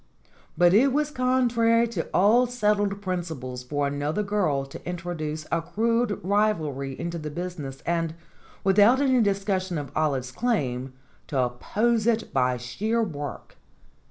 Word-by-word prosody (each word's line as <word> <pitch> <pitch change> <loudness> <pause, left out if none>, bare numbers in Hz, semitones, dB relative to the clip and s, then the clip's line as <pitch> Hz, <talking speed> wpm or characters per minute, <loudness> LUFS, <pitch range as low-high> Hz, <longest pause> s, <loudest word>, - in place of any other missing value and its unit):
But 175 +1 +5
it 260 +7 +5
was 300 +2 0
contrary 235 -3 +2
to 185 -8 -3
all 225 +6 +4
settled 210 -4 0
principles 160 -9 -4
for 145 +3 -2
another 145 +7 -1
girl 185 -10 0
to 135 - -11
introduce 170 -3 -4
a 170 - +1
crude 220 +5 0
rivalry 160 -10 0
into 170 0 -3
the 150 -1 -5
business, 150 -5 -6
and, 165 -1 -1 0.5
without 205 +6 +5
any 260 -3 +3
discussion 195 -3 0
of 145 -1 -6
Olive's 135 -5 0
claim, 130 - -1 0.3
to 140 - -3
oppose 210 - 0
it 225 -1 0
by 125 -1 +2
sheer 210 - -1
work. 145 - -6
180 Hz, 135 wpm, -26 LUFS, 145-220 Hz, 0.5 s, But